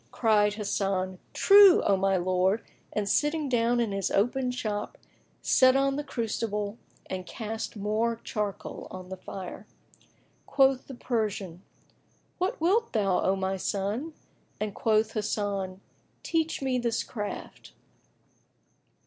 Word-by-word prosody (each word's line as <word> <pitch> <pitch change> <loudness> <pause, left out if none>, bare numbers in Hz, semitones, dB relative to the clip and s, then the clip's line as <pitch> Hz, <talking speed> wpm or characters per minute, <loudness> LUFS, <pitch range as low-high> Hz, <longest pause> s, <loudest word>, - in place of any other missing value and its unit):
Cried 210 -3 +2
Hasan, 195 -3 -1
"True, 400 -2 +7
O 200 - +3
my 195 0 +2
lord," 185 +4 +1 0.3
and 210 -1 -2
sitting 295 +5 +1
down 240 -1 +2
in 230 -3 0
his 195 -1 -1
open 250 +5 +1
shop, 215 -4 -3 0.5
set 260 0 +5
on 275 0 +2
the 295 - -2
crucible 220 -4 -3 0.3
and 185 -1 -5
cast 220 0 -5
more 215 +3 0
charcoal 210 -2 -4
on 185 -1 -9
the 190 - -6
fire. 190 +2 -8 0.8
Quoth 270 -2 +3
the 270 - -8
Persian, 210 -8 -2 0.8
"What 370 +2 -1
wilt 405 +8 +2
thou, 195 -5 +2
O 190 - +2
my 190 0 -1
son?"; 210 - -2 0.5
and 210 -1 -2
quoth 220 0 +1
Hasan, 200 -3 -2 0.4
"Teach 325 -3 -1
me 255 -2 +1
this 235 -2 0
craft." 210 -3 -7
215 Hz, 125 wpm, -28 LUFS, 195-250 Hz, 0.8 s, True